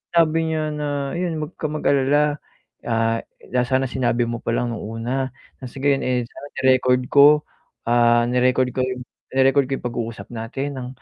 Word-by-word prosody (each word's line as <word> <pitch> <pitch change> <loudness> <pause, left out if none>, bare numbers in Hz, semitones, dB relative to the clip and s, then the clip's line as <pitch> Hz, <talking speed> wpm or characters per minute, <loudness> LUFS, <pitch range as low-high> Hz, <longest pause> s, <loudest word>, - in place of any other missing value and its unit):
sabi 165 -1 +3
niya 155 -1 -1
na, 150 0 -3 0.3
ayun, 165 -4 -2
wag 150 - -8
ka 155 - -1
mag 155 0 -5
alala, 145 +2 +3 0.5
ah, 115 -1 +1 0.5
sana 130 +1 +1
sinabi 120 -1 0
mo 120 0 -4
palang 120 0 -1
nung - - -6
una. 120 +5 -3 0.3
Ah 130 - -6
sige, 140 +2 +1
yun 135 - -1
eh, 125 -2 0
sana 145 - -11 0.2
ni-record 130 -1 +4
ko. 140 0 +9 0.6
Ah, 120 0 +4
ni-record 125 +1 +2
ko 130 - -1
yung 130 -1 -4 0.3
ire-record 135 +1 +4
ko - - -1
yung - - -12
pag-uusap 115 -3 -5
natin 130 +5 -5
ng 125 -1 -5
130 Hz, 175 wpm, -22 LUFS, 120-140 Hz, 0.6 s, ko